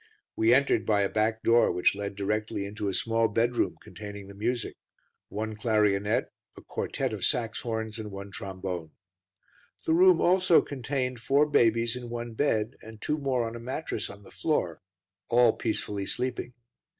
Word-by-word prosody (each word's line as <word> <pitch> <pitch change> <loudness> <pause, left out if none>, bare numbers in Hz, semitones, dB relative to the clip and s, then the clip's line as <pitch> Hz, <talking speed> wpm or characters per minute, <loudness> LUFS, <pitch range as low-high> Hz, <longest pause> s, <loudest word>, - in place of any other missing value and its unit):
We 110 +1 +3
entered 140 +3 +4
by 105 -2 +2
a 100 - 0
back 110 +1 0
door 115 +1 +5
which 90 - +3
led 100 0 -5
directly 105 +1 -2
into 105 +1 -4
a 100 - -1
small 115 0 +2
bedroom 115 -5 0
containing 105 -1 -8
the - - -9
music: 115 +3 -2 0.5
one 110 +1 -4
clarionet, 105 -2 +1 0.3
a - - -10
quartet - - -2
of - - -5
Saxhorns, 110 -1 -1
and 110 -1 -5
one 100 0 -8
trombone. 95 -4 -5 0.9
The 160 - +2
room 180 0 +6
also 180 -1 +5
contained 130 -2 -3
four 140 +5 +3
babies 115 -4 +3
in 125 -1 -7
one 120 0 -5
bed, 110 -3 0
and 110 -1 -11
two 150 +6 -1
more 130 -4 0
on 115 - -6
a - - -6
mattress 130 -1 -3
on 100 +1 -11
the - - -15
floor, 90 - -1 0.5
all 120 -1 +5
peacefully 105 -3 -2
sleeping. 125 -1 -2
110 Hz, 160 wpm, -28 LUFS, 105-125 Hz, 0.9 s, room